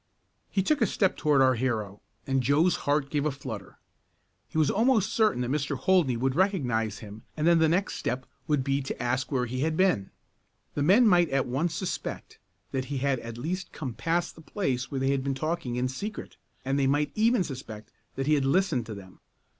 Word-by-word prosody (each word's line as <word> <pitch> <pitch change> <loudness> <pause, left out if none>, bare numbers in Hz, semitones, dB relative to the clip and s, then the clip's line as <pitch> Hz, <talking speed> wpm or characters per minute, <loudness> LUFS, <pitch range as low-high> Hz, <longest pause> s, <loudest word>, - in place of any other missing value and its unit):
He 195 - 0
took 300 +5 +1
a 225 - +4
step 190 0 +1
toward 145 -3 +3
our 130 0 +5
hero, 110 -5 -2 0.2
and 135 -1 +1
Joe's 145 +8 +3
heart 145 -1 +1
gave 145 -2 0
a 155 - +1
flutter. 110 -8 -7 0.7
He - - -6
was 155 -2 +3
almost 225 -1 +2
certain 215 - +2
that 125 - -2
Mr. 145 -1 -1
Holdney 165 -7 +2
would 130 +2 0
recognize 125 - +1
him 105 +1 -10 0.2
and 155 - 0
then 170 0 +5
the 160 -1 +4
next 185 +5 0
step 125 +2 -2 0.2
would 150 -3 +1
be 140 +1 0
to 135 - -5
ask 130 +3 -1
where 125 -3 +1
he 125 +2 -4
had 155 +3 0
been. 180 - +2 0.6
The 145 - -2
men 200 - +5
might 175 -5 +4
at 135 -1 +1
once 150 +7 -1
suspect 185 +1 -5 0.3
that 130 -1 -2
he 140 +1 -4
had 135 -1 0
at 115 0 -8
least 170 +8 -4
come 135 -6 -5
past 170 +7 -1
the 160 - -14
place 135 -9 -2
where 135 - -3
they 135 +1 +1
had 135 -1 0
been 135 0 -1
talking 155 -3 -2
in 125 +1 0
secret, 200 +12 -6 0.3
and 135 +1 0
they 135 - +2
might 145 +2 +1
even 225 -1 +3
suspect 115 -8 -8 0.2
that 135 - -2
he 155 - +3
had 145 -2 +2
listened 135 - +1
to 110 - -6
them. 95 -2 -12
140 Hz, 210 wpm, -27 LUFS, 125-170 Hz, 0.7 s, our